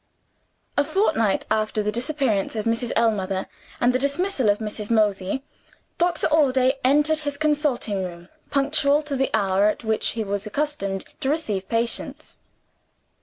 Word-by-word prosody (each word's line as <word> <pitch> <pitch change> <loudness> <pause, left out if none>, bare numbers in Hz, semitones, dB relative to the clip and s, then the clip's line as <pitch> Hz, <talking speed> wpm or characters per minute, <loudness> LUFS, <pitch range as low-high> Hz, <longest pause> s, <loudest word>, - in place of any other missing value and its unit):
A 285 - +5
fortnight 305 - +1
after 215 0 +1
the 210 - 0
disappearance 240 -4 0
of 215 - -2
Mrs. 230 +1 0
Ellmother, 195 -4 +1 0.3
and 245 +1 +3
the 255 - +1
dismissal 280 - 0
of 205 - +3
Mrs. 210 -1 -5
Mosey, 210 +1 +1 0.6
Doctor 345 -1 +1
Allday 265 -3 +3
entered 295 +4 +3
his 290 -2 -4
consulting 285 -10 0
room, 175 -1 -8 0.2
punctual 285 +1 +2
to 295 -1 -3
the 270 0 +1
hour 200 -2 +2
at 215 - -1
which 220 -1 0
he 225 - -2
was 200 +1 -3
accustomed 210 -7 -2
to 265 - -1
receive 215 -12 -1
patients. 230 +1 -3
235 Hz, 145 wpm, -23 LUFS, 210-290 Hz, 0.6 s, A